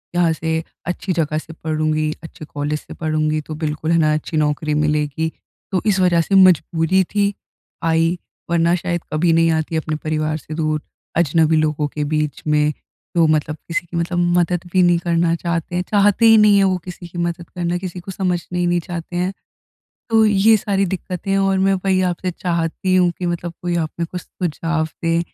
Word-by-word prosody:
यहाँ 170 -2 +3
से, 160 0 -2 0.2
अच्छी 180 +1 -2
जगह 155 -2 0
से 165 +1 -6
पढ़ूँगी, 155 -1 -1
अच्छे 160 -1 -10
कॉलेज 150 +1 -3
से - - -11
पढ़ूँगी, 155 -1 -1
तो 155 +1 -7
बिल्कुल 155 +1 -1
है 170 - +4
ना 155 -2 +3
अच्छी 155 +1 -2
नौकरी 150 0 0
मिलेगी। 150 +1 0 0.4
तो 185 - +1
इस 200 -3 +2
वजह 175 -2 +4
से 195 - 0
मजबूरी 185 0 +4
थी 205 +2 0 0.5
आई, 165 +1 +2 0.3
वरना 170 0 +3
शायद 175 -1 -2
कभी 165 +2 +3
नहीं 165 0 +4
आती 160 0 -1
अपने 155 0 -2
परिवार 155 0 -1
से 155 - -9
दूर। 155 -2 -1 0.4
अजनबी 160 -1 +3
लोगों 150 -1 +1
के 150 0 -4
बीच 150 -1 -1
में, 150 0 +3 0.4
जो 170 - +5
मतलब 155 0 +1
किसी 170 +1 -2
की 170 0 -6
मतलब 170 +1 -1 0.2
मदद 175 0 0
भी 185 - +4
नहीं 175 -1 +4
करना 170 -1 +1
चाहते 170 0 -3
हैं, 180 - 0
चाहते 205 +2 +4
ही 225 -1 +8
नहीं 210 -1 +6
है 200 - +5
वो 185 -1 +2
किसी 180 -1 -8
की 175 - -11
मदद 170 0 -3
करना, 175 0 -2
किसी 180 -1 -6
को 185 +2 -8
समझना 180 -2 -2
ही 175 - +1
नहीं 175 0 +2
चाहते 175 0 -6
हैं। 180 +2 0 0.8
तो 225 -1 +5
ये 215 +2 +5
सारी 195 -1 0
दिक्कतें 185 +1 -3
और 195 0 +2
मैं 195 +1 +3
वही 190 -1 +2
आपसे 180 +1 -2
चाहती 170 +1 -1
हूँ 180 -1 +4
कि 180 - -2
मतलब 175 0 -3
कोई 175 -1 -1
आपने 170 +1 -2
कुछ 180 +2 -6
सुझाव 165 -2 -2
दे, 165 0 +2
170 Hz, 195 wpm, -20 LUFS, 155-180 Hz, 0.8 s, ही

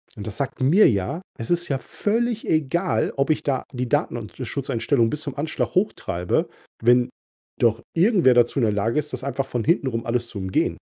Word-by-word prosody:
Und 105 -1 -7
das 105 - -4
sagt 140 -2 -3
mir 170 +11 +6
ja, 100 - -2 0.2
es 115 - -5
ist 175 0 +1
ja 135 - +1
völlig 230 - -1
egal, 160 +4 +1
ob 140 +2 +1
ich - - +1
da 135 -3 0
die 125 -1 -3
Datenschutzeinstellungen 125 - -1
bis 150 +3 -3
zum 140 -4 -5
Anschlag 155 +2 -2
hochtreibe, 95 - 0 0.4
wenn 120 +1 +4 0.5
doch 115 -1 +2
irgendwer 175 - +5
dazu 120 +3 +3
in 120 - +3
der 105 - +1
Lage 115 +7 +1
ist, 150 0 -4
das 130 0 -4
einfach 140 0 -2
von 120 -3 -2
hintenrum 130 -7 0
alles 120 0 -1
zu 110 - -8
umgehen. 95 -1 0
130 Hz, 185 wpm, -23 LUFS, 115-155 Hz, 0.5 s, mir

